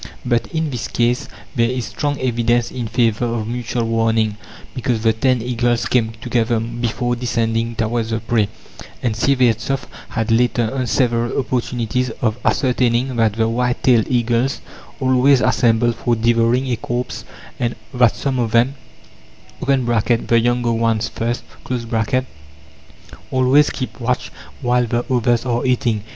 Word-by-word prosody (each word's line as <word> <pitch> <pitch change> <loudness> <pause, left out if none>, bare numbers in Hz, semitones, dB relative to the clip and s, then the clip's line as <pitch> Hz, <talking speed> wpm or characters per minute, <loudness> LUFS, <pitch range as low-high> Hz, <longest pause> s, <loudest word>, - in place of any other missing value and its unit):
But 120 -2 +1
in 160 -2 -2
this 120 -3 -3
case 120 +4 0 0.3
there 115 -1 +2
is 125 -2 -2
strong 145 -2 -2
evidence 120 -1 +1
in 120 -3 -4
favour 115 0 +1
of 115 -2 -2
mutual 120 0 -2
warning, 115 -1 +1 0.4
because 120 -4 -1
the 110 -1 +4
ten 125 +1 +1
eagles 120 -1 0
came 115 -3 +1
together 120 -1 0
before 120 +1 -2
descending 115 -1 -1
towards 115 0 -1
the 110 0 -1
prey, 110 -2 0 0.5
and 120 -3 +1
Syevertsoff 130 +2 +1 0.2
had 115 -1 -2
later 120 -1 +2
on 130 -2 -1
several 120 +1 +1
opportunities 125 -1 -1
of 110 0 0
ascertaining 125 -1 +1
that 110 -2 +3
the 110 +1 +1
whitetailed 120 0 +2
eagles 120 +1 +1 0.4
always 130 +1 +4
assemble 120 0 +3
for 120 +1 0
devouring 115 +2 +2
a 120 - 0
corpse, 120 +2 -4 0.4
and 120 -1 -1 0.2
that 125 -3 +3
some 135 -3 -2
of 115 -2 0
them 120 +3 +4 0.9
(the 120 -3 +2
younger 120 0 +1
ones 115 -1 0
first) 120 +2 -3 1.9
always 130 +3 +4
keep 130 -1 -5
watch 125 +1 -1 0.3
while 125 0 +2
the 120 +2 -1
others 120 -1 +2
are 120 -1 0
eating. 120 -4 +1
120 Hz, 140 wpm, -19 LUFS, 115-125 Hz, 1.9 s, the